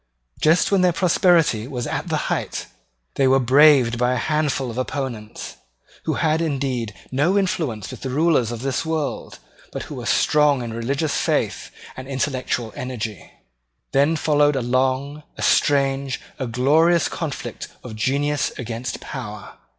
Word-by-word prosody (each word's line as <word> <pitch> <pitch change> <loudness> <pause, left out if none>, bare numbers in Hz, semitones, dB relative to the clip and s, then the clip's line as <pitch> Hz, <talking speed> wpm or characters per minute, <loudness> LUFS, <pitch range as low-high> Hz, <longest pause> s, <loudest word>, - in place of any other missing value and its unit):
Just 160 +5 +3
when 195 -2 +4
their 180 -1 +4
prosperity 165 - +3
was 125 -3 -4
at - - -3
the - - -1
height, - - -3 0.5
they 135 - +4
were 135 +1 +5
braved 130 -2 +5
by 125 +1 +2
a - - 0
handful 145 -2 0
of 120 - -5
opponents, 130 -5 -5 0.5
who - - 0
had 160 0 +1
indeed 135 -7 -2 0.2
no 150 +9 +2
influence 150 - -1
with - - -9
the 135 - -4
rulers 145 -4 +2
of 120 0 -6
this 135 -1 -1
world, 160 -3 -3 0.3
but - - -5
who - - -9
were - - -6
strong 145 -4 +3
in 115 -1 -5
religious 140 +6 -1
faith - - -1 0.3
and 130 0 -8
intellectual 130 -4 -2
energy. 115 -6 -5 0.6
Then 145 +4 +3
followed 145 -1 +3
a 135 - 0
long, 130 +4 0 0.2
a - - -4
strange, 135 -1 +2 0.2
a 130 - -2
glorious 155 +8 +3
conflict 160 -5 -5 0.2
of 115 -3 -8
genius 140 +6 0
against 120 0 -5
power. 105 -6 -7
135 Hz, 150 wpm, -22 LUFS, 125-150 Hz, 0.6 s, were